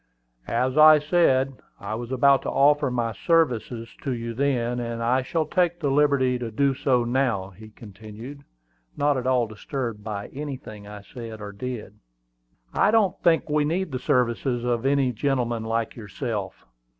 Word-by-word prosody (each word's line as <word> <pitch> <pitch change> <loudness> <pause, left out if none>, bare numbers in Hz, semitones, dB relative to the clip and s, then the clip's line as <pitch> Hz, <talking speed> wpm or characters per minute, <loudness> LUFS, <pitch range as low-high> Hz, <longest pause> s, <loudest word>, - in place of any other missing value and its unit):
"As 130 +5 0
I 155 0 +9
said, 140 -4 +2 0.2
I - - -5
was 120 +2 -5
about 135 +1 +4
to - - -4
offer 145 0 +3
my 120 -2 -1
services 120 - 0
to 135 - -2
you 115 -1 -4
then; 125 -2 0
and 115 -1 -4
I 125 +3 +2
shall 155 +5 -1
take 175 +1 0
the 145 -5 0
liberty 135 -3 +2
to 120 -2 -4
do 135 +5 +1
so 125 -2 +1
now," 120 -6 0
he 110 +3 -13
continued, 110 +6 -11 0.5
not 145 0 +2
at 130 -1 -2
all 125 -2 +3
disturbed 110 0 -5
by 105 -2 -5
anything 130 -8 -7
I 105 0 -9
said 115 -1 -9
or 105 -1 -7
did. 105 -1 -7 0.7
"I - - +3
don't 210 -4 +2
think 165 -1 +3
we 150 -1 +1
need 170 +3 -1
the 130 - -3
services 120 0 0
of 120 +1 0
any 135 -2 +2
gentleman 120 -2 -1
like 115 0 -2
yourself." 105 -1 -5
125 Hz, 165 wpm, -24 LUFS, 115-140 Hz, 0.7 s, I